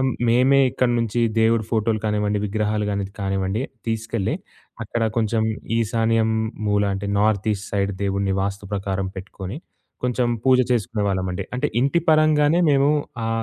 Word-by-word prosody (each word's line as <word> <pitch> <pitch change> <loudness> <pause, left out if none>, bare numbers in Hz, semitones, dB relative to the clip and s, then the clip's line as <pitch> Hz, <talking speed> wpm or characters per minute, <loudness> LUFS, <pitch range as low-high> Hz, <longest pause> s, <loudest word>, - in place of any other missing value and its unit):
ఆహ్, 130 0 +2 0.2
మేమే 130 +4 +4
ఇక్కడి 125 -1 +1
నుంచి 115 0 -1 0.2
దేవుడి 115 0 +3
ఫోటోలు 110 -1 +1
కానివ్వండి, 105 -1 0
విగ్రహాలు 105 0 -1
గాని 100 - -1
అనేది 95 - -10
కానివ్వండి 95 +3 -1 0.2
తీసుకెళ్ళి 110 -2 -1 0.5
అక్కడ 115 +1 -3
కొంచెం 110 0 +1 0.4
ఈశాన్యం 115 0 +1 0.4
మూల 105 0 +2
అంటే 100 +1 -4
నార్త్ 105 0 +1
ఈస్ట్ 105 0 -5
సైడ్ 100 0 0
దేవుడిని 100 0 0
వాస్తు 100 0 -3
ప్రకారం 95 -1 -2
పెట్టుకొని, 95 +2 -7 0.5
కొంచెం 125 -1 +1 0.2
పూజ 130 -1 +5
చేసుకునే 115 -2 0
వాళ్ళమండి 95 0 -2
అంటే 125 - 0
ఇంటి 140 +6 +2
పరంగానే 155 +1 +4
మేము 140 +1 +4 0.4
ఆ - - -1
110 Hz, 145 wpm, -22 LUFS, 100-120 Hz, 0.5 s, పూజ